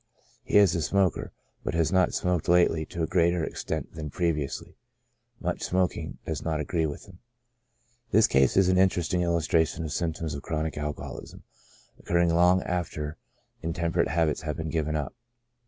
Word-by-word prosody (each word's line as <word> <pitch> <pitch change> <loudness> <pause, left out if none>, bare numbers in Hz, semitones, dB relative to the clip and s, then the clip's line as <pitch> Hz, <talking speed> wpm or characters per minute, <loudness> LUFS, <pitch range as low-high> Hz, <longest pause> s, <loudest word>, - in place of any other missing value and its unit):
He - - +2
is 100 -4 +6
a 85 - 0
smoker, 95 +3 +1 0.3
but - - -2
has 80 -1 +2
not 95 -1 +3
smoked 90 -3 0
lately 85 -3 +3
to 85 -2 -3
a - - +3
greater 85 0 +2
extent - - -4
than 80 -2 -6
previously. 75 -3 -2 0.6
Much 90 0 -2
smoking 90 -2 -1
does 80 -3 -3
not 80 -2 -1
agree 80 +2 0
with 75 - -7
him. 95 -3 -16 0.9
This 110 0 +5
case 65 +3 +3
is 95 -2 +5
an 95 0 +3
interesting 90 -2 +2
illustration 85 -1 +1
of 80 - -4
symptoms 80 -2 -2
of 70 - -5
chronic 80 0 -3
alcoholism, 75 0 -6 0.6
occurring 85 -1 +2
long 90 +2 +4
after 80 -4 -3 0.4
intemperate 85 +1 0
habits 80 -1 +1
have 75 -2 -4
been 80 -2 -4
given 80 -1 -1
up. 75 -2 -3
85 Hz, 160 wpm, -27 LUFS, 80-90 Hz, 0.9 s, is